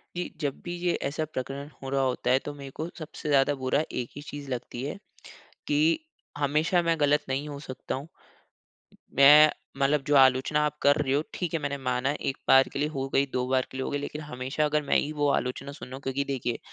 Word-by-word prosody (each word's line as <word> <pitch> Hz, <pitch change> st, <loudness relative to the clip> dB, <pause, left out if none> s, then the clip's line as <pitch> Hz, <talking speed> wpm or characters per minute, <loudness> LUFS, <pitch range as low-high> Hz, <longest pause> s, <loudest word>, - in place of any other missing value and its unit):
जी। 180 Hz, 0 st, -3 dB
जब 145 Hz, -2 st, -2 dB
भी 175 Hz, 0 st, -3 dB
ये 175 Hz, 0 st, +1 dB
ऐसा 150 Hz, +3 st, -2 dB
प्रकरण 140 Hz, 0 st, -5 dB
हो 135 Hz, -, -5 dB
रहा 135 Hz, 0 st, +1 dB
होता 125 Hz, -1 st, 0 dB
है 130 Hz, -, +5 dB
तो 145 Hz, -, -4 dB
मेरे 140 Hz, -1 st, -9 dB
को 160 Hz, -, -3 dB
सबसे 155 Hz, -1 st, -6 dB
ज़्यादा 140 Hz, 0 st, +4 dB
बुरा 135 Hz, +4 st, +2 dB
एक 120 Hz, -, -3 dB
ही 145 Hz, -, -7 dB
चीज़ 145 Hz, -1 st, -8 dB
लगती 125 Hz, 0 st, -4 dB
है 145 Hz, +7 st, -4 dB, 0.7 s
कि 295 Hz, -, +1 dB, 0.6 s
हमेशा 155 Hz, +5 st, +2 dB
मैं 165 Hz, -1 st, +1 dB
ग़लत 150 Hz, 0 st, +3 dB
नहीं 135 Hz, +3 st, -1 dB
हो 145 Hz, -1 st, -6 dB
सकता 130 Hz, -, -4 dB
हूँ। 135 Hz, +3 st, -7 dB, 1.1 s
मैं 150 Hz, +3 st, +8 dB, 0.3 s
मतलब 140 Hz, +1 st, +2 dB
जो 145 Hz, -, +3 dB
आलोचना 130 Hz, +2 st, +5 dB
आप 150 Hz, 0 st, -2 dB
कर 145 Hz, 0 st, +5 dB
रहे 145 Hz, -3 st, 0 dB
हो 145 Hz, -, +3 dB
ठीक 175 Hz, -3 st, -3 dB
है, 165 Hz, -, +1 dB
मैंने 140 Hz, -1 st, -2 dB
माना 130 Hz, 0 st, 0 dB
1 135 Hz, -, -2 dB
बार 135 Hz, 0 st, +7 dB
के -, -, -3 dB
लिए 150 Hz, -, +2 dB
हो 135 Hz, -3 st, -3 dB
गयी, 140 Hz, -, +4 dB
2 125 Hz, 0 st, 0 dB
बार 130 Hz, -1 st, +2 dB
के 130 Hz, -, -7 dB
लिए 130 Hz, -, -2 dB
हो -, -, -3 dB
गयी 145 Hz, -, -1 dB
लेकिन 150 Hz, +1 st, -5 dB
हमेशा 135 Hz, +1 st, -2 dB
अगर 150 Hz, 0 st, +1 dB
मैं 140 Hz, -, +3 dB
ही 150 Hz, -, -1 dB
वो 145 Hz, -1 st, +1 dB
आलोचना 130 Hz, +2 st, -2 dB
सुनू 130 Hz, -2 st, -9 dB
क्योंकि 135 Hz, 0 st, -2 dB
देखिए 130 Hz, -4 st, -2 dB
140 Hz, 225 wpm, -27 LUFS, 135-150 Hz, 1.1 s, मैं